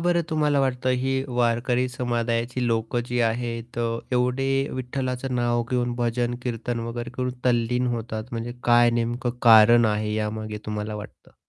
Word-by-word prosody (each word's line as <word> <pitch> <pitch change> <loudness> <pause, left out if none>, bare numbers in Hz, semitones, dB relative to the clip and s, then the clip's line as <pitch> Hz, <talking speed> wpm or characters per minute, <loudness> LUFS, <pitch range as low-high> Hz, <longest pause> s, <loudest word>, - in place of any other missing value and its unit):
बरं 175 -1 +3
तुम्हाला 150 -2 +2
वाटतं 130 -1 0
ही 135 +1 0 0.3
वारकरी 120 +1 +2
समुदायाची 120 0 -1
लोक 115 0 -1
जी 125 0 -2
आहेत 115 0 -4
अ, 115 -1 -1
एवढे 125 +2 +1 0.3
विठ्ठलाचं 130 0 -3
नाव 120 -1 +1
घेऊन 125 -1 0
भजन-कीर्तन 120 0 -2
वगैरे 120 0 -5
घेऊन 125 0 -1
तल्लीन 125 0 +1
होतात, 110 -1 -5
म्हणजे 115 +1 -4
काय 120 0 +5
नेमकं 120 +1 -1
कारण 115 0 +7
आहे 105 0 -2
यामागे, 110 0 -3
तुम्हाला 105 0 -3
वाटतं? 105 0 -11
120 Hz, 140 wpm, -24 LUFS, 115-125 Hz, 0.3 s, कारण